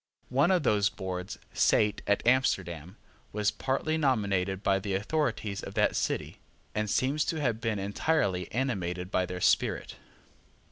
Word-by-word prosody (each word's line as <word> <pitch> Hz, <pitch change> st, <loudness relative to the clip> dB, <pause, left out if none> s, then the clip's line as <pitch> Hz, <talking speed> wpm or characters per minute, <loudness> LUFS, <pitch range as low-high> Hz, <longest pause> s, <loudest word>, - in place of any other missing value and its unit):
One 140 Hz, +7 st, +3 dB
of 180 Hz, -4 st, +3 dB
those 105 Hz, -4 st, +3 dB
boards 90 Hz, -2 st, -5 dB, 0.2 s
sate 105 Hz, -1 st, +3 dB
at 100 Hz, -, +1 dB
Amsterdam, 95 Hz, -, +1 dB, 0.3 s
was 105 Hz, 0 st, +1 dB
partly 135 Hz, +7 st, -1 dB
nominated 100 Hz, -8 st, +1 dB
by 95 Hz, -1 st, +3 dB
the 100 Hz, -1 st, -2 dB
authorities 105 Hz, -2 st, -1 dB
of -, -, -8 dB
that -, -, +2 dB
city, -, -, -2 dB, 0.3 s
and 105 Hz, 0 st, -1 dB
seems 140 Hz, +7 st, +1 dB
to 160 Hz, -, -2 dB
have 120 Hz, -6 st, 0 dB
been 110 Hz, -2 st, -1 dB
entirely 100 Hz, -, 0 dB
animated 95 Hz, -8 st, -2 dB
by 90 Hz, -1 st, +1 dB
their 90 Hz, 0 st, -5 dB
spirit. -, -, +1 dB
105 Hz, 145 wpm, -29 LUFS, 95-130 Hz, 0.3 s, One